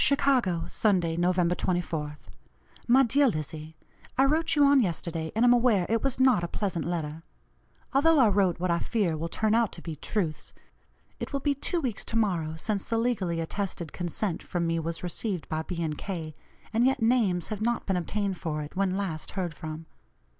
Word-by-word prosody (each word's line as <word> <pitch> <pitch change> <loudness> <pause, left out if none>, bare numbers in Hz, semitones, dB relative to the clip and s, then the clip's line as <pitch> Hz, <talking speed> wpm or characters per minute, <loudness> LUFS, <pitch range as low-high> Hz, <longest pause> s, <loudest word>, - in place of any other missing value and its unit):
"CHICAGO, 255 -11 +2
Sunday, 180 -6 +1
Nov. 175 +2 +2
24th. 175 -4 -1 0.7
"MY 260 +3 +6
DEAR 275 +4 +4
LIZZIE: 155 - -4 0.4
I 265 - +5
wrote 320 +3 +2
you 290 -1 +5
on 280 0 +6
yesterday 165 -5 -1
and 230 +2 +3
am 245 - +7
aware 235 -7 +3
it 225 0 +1
was 270 -2 0
not 260 -9 +4
a - - -1
pleasant 180 -3 -2
letter, 160 -2 -3 0.7
although 320 +4 +4
I 255 -5 +6
wrote 195 -4 +2
what 180 0 0
I 170 - +2
fear 200 -8 0
will 165 +2 -4
turn 215 +5 0
out 230 -2 +3
to - - -9
be 165 -2 -5
truths. 160 0 -3 0.7
It - - -5
will 280 - -1
be 285 +1 +1
two 310 +5 -2
weeks 245 -7 -2
to - - -5
morrow 175 -8 0
since 200 +4 -1
the 230 - -1
legally 205 -8 0
attested 175 -1 -4
consent 175 +1 -2
from 175 -1 -2
me 165 0 0
was 165 +1 -4
received 180 +1 -3
by 155 0 -1
B. 170 +1 -4
and 155 -2 -2
K., 165 -3 -5 0.4
and 230 +2 +3
yet 260 -2 +2
names 220 -7 +2
have 215 -1 -4
not 235 +1 0
been 190 - 0
obtained 195 +2 -2
for 155 -2 -3
it, 145 - -10
when 190 -1 +1
last 175 -6 -3
heard 175 -4 -1
from. 155 +1 -7
185 Hz, 195 wpm, -28 LUFS, 165-230 Hz, 0.7 s, am